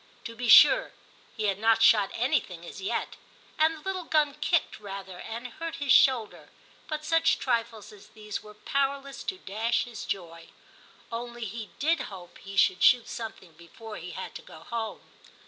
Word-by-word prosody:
To 230 - -7
be 240 0 -3
sure, - - +8 0.4
he 220 - -2
had 200 -2 0
not 225 +1 +4
shot 205 -4 +6
anything 225 - -1
as 195 - -9
yet, 205 +5 -3 0.4
and 320 +1 +4
the - - -14
little 375 -1 -4
gun 300 -3 +2
kicked 300 0 0
rather 195 -3 -8
and 230 +2 -7
hurt 330 +7 -6
his 285 -2 -1
shoulder, 235 -4 +3 0.4
but 305 -1 -4
such 325 0 +3
trifles 230 -4 -2
as 205 - -15
these 210 -1 -7
were 210 0 -14
power 275 +5 0
less 275 0 -10
to 375 - -3
dash 225 - -1
his 235 -4 -8
joy; 170 -3 -5 0.6
only 240 0 -5
he 220 +1 -6
did 320 +3 +1
hope 180 -3 -12
he 195 0 -9
should 185 -1 +4
shoot 245 -2 +5
something 220 -6 -7
before 210 +7 -11
he 175 - -8
had - - -6
to - - -8
go 160 - -14
home. 225 +4 -5
230 Hz, 180 wpm, -28 LUFS, 200-275 Hz, 0.6 s, sure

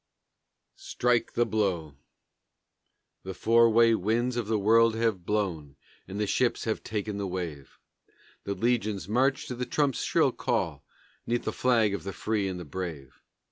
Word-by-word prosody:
STRIKE 125 -1 0
THE 120 - +2
BLOW 95 -9 -1 1.3
The 95 0 -7
four 115 +1 +4
way 115 +1 +5
winds 115 +5 0
of 120 -3 -2
the 110 0 +1
world 115 +2 +4
have 110 -6 -1
blown, 85 -10 -2 0.3
And 100 +2 -6
the 105 - +1
ships 120 +4 0
have 110 - -2
ta'en 105 -1 -3
the 100 -1 -2
wave; 85 -7 -6 0.7
The 100 - -3
legions 110 -2 0
march 130 +5 +1
to - - -5
the 125 0 -4
trumps' 140 -1 0
shrill - - +2
call - - -2 0.4
'Neath 120 +1 0
the - - -3
flag 115 -5 +2
of 100 - -4
the 100 - -5
free 105 -3 -1
and 90 -3 -5
brave. 80 -8 -6
105 Hz, 155 wpm, -28 LUFS, 95-115 Hz, 1.3 s, way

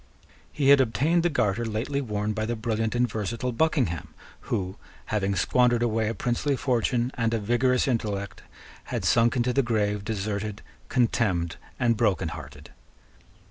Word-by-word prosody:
He 140 -2 +1
had 140 -1 +8
obtained 145 +8 +2
the 175 - +2
garter 115 - 0
lately 115 +6 -2
worn 105 -3 -2
by 110 +1 -2
the 120 - -1
brilliant 110 0 -1
and 125 +1 +3
versatile 115 +3 -3
Buckingham, 125 - 0 0.3
who, 95 0 -2 0.4
having 100 -2 +1
squandered 120 +5 +3
away 110 -2 +1
a 115 - -3
princely 125 +4 0
fortune 125 -1 0
and 115 -1 0
a - - 0
vigorous 120 +5 +2
intellect, 105 -5 -2 0.4
had - - -3
sunk 115 +1 +3
into 125 0 +1
the 135 - +3
grave 105 -4 0
deserted, 105 0 -3 0.3
contemned, 110 -9 +1 0.2
and 120 -3 +2
broken 100 -8 +1
hearted. - - -10
115 Hz, 150 wpm, -26 LUFS, 105-125 Hz, 0.4 s, had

